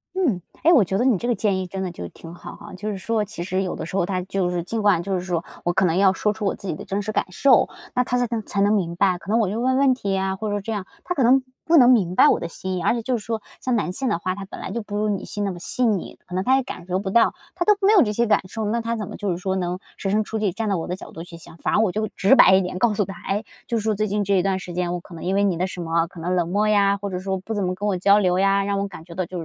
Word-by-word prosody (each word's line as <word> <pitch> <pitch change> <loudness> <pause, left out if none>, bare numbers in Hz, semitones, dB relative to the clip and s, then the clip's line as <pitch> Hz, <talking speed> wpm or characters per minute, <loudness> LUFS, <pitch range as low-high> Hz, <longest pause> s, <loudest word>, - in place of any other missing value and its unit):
嗯。 285 - +1 0.2
诶， 335 - +6
我 260 -10 +6
觉 190 +1 -1
得 240 - +1
你 260 -4 +4
这 215 +6 -3
个 240 - +2
建 200 -4 0
议 185 - -4
真 190 +1 -4
的 185 - -3
就 90 - -7
挺 165 - -12
好 175 - -10
哈， - - -12
就 210 +4 -5
是 200 - -3
说 220 +3 -1
其 195 -4 -6
实 185 +1 -1
有 185 - -3
的 - - -5
时 165 - -7
候 195 - +2
他 185 0 -1
就 190 -1 -1
是 175 -1 -2
尽 225 +5 -3
管 195 -5 +3
就 195 - -3
是 180 - 0
说 175 -2 -2 0.2
我 175 - +1
可 190 +1 +3
能 165 -1 +1
要 195 0 +5
说 210 +2 0
出 215 0 -7
我 195 - 0
自 195 - -9
己 - - -1
的 200 - -8
真 200 +1 -2
实 215 - -3
感 - - +1
受， 255 +7 +4 0.2
那 250 - +2
他 250 0 -1
才 245 - +2 0.2
才 200 -1 -2
能 205 +2 +4
明 170 -4 0
白。 185 -1 +2
可 175 - -12
能 225 +2 +3
我 220 - +2
就 210 +5 -2
问 260 +1 +2
问 270 -1 +4
题 205 -6 -3
呀， 190 0 0
或 215 +2 -4
者 205 0 -1
这 225 - -5
样， 205 -4 -4 0.2
他 360 - -2
可 275 -7 +1
能 260 +2 +5 0.2
不 335 0 +5
能 250 -3 +7
明 185 -8 +2
白 - - +7
我 - - +2
的 170 - -4
心 185 +2 -5
意。 180 - -3
而 230 - +2
且 230 - -4
就 255 +2 0
是 220 - -5
说， 225 -2 -3 0.2
像 255 -2 0
男 205 -5 -1
性 260 +7 -2
的 - - +1
话， 185 +2 -2
他 200 +1 -7
本 - - -10
来 - - -6
就 235 +3 -3
不 205 0 -5
如 210 +1 0
女 205 -2 -1
性 205 - -4
那 200 - -1
么 175 - -8
细 250 +7 -1
腻， 210 -6 -1
可 180 - -12
能 185 +1 0
他 260 +5 +4
也 270 - +1
感 185 -7 -8
受 180 - 0
不 190 0 -3
到， 235 +3 +4 0.2
他 350 - -1
都 420 +3 +4
没 415 - +6
有 400 - +7
这 210 - +2
些 235 +3 +1
感 210 -2 +3
受， 220 +3 -4
那 230 +3 0
他 230 +1 -2
怎 210 -3 -4
么 210 - -8
就 205 - -3
是 175 - -1
说 190 +1 -2
能 180 -1 -2 0.2
设 195 - -3
身 215 +2 +2
处 220 +1 -4
地 210 -3 +1
站 225 +4 -3
在 200 - +1
我 165 - -3
的 180 - -2
角 - - -11
度 160 - -8
去 170 -1 -11
想。 165 - -14
反 - - -1
而 - - +4
我 215 -4 +2
就 215 +3 -1
直 195 +6 +4
白 190 - +7
一 190 - +4
点 180 0 -4
告 220 -2 +2
诉 205 - +1
他， 195 - -7 0.2
诶， 205 +3 -1 0.2
就 230 -2 0
说 215 0 0
这 215 +1 0
一 200 -2 +1
段 190 0 0
时 180 -2 -7
间， 175 0 -1
我 180 - -2
可 170 - -15
能 165 - -8
因 190 +2 0
为 200 - +3
你 190 -4 +1
的 185 +2 0
什 180 -1 -7
么， 165 0 0
可 170 - -13
能 180 +3 -1
冷 170 -2 0
漠 205 +4 +1
呀， 200 -1 +3
或 200 0 -5
者 180 - -3
说 190 0 -2
不 205 +4 -6
怎 205 -2 -1
么 180 0 -1
跟 205 +3 -3
我 195 - +1
交 200 +3 +5
流 185 -3 +2
呀， 195 0 +3
让 200 0 -1
我 200 - -1
感 180 -4 -11
觉 170 - -11
到 185 +2 -1
就 180 0 -6
195 Hz, 375 characters per minute, -23 LUFS, 185-220 Hz, 0.2 s, 能